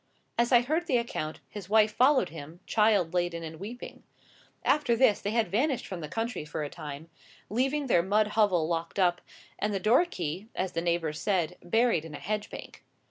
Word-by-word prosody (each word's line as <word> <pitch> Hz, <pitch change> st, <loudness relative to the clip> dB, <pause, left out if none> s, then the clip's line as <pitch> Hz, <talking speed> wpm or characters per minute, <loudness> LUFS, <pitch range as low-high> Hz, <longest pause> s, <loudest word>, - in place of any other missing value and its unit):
As 235 Hz, +1 st, +1 dB
I 240 Hz, -2 st, +7 dB
heard 315 Hz, +7 st, -1 dB
the 260 Hz, -7 st, +3 dB
account, 160 Hz, -10 st, -4 dB
his 200 Hz, -3 st, -9 dB
wife 215 Hz, 0 st, +4 dB
followed 260 Hz, -5 st, +4 dB
him, 160 Hz, +1 st, -10 dB
child 210 Hz, -6 st, +2 dB
laden 175 Hz, -2 st, -1 dB
and 160 Hz, -1 st, -8 dB
weeping. 230 Hz, +6 st, -8 dB, 0.6 s
After 290 Hz, -6 st, +3 dB
this, 230 Hz, -3 st, +3 dB
they 205 Hz, -, -2 dB
had 225 Hz, +1 st, +1 dB
vanished 255 Hz, +5 st, +1 dB
from 185 Hz, -, -6 dB
the 155 Hz, -, -5 dB
country 225 Hz, -2 st, -3 dB
for 150 Hz, 0 st, -4 dB
a 145 Hz, -, -5 dB
time, 145 Hz, +2 st, -8 dB, 0.4 s
leaving 270 Hz, +6 st, 0 dB
their 205 Hz, -9 st, +4 dB
mud 210 Hz, +4 st, +2 dB
hovel 200 Hz, -7 st, +2 dB
locked 165 Hz, +1 st, -3 dB
up, 175 Hz, -2 st, +2 dB, 0.4 s
and 210 Hz, 0 st, -1 dB
the -, -, 0 dB
door 235 Hz, -, +4 dB
key, 180 Hz, -, -5 dB
as 185 Hz, -1 st, -2 dB
the 165 Hz, -, -2 dB
neighbours 170 Hz, -3 st, -1 dB
said, 180 Hz, -4 st, 0 dB
buried 225 Hz, -1 st, +2 dB
in 160 Hz, -2 st, -8 dB
a -, -, -7 dB
hedge 210 Hz, +1 st, -3 dB
bank. -, -, -10 dB
205 Hz, 195 wpm, -29 LUFS, 170-235 Hz, 0.6 s, I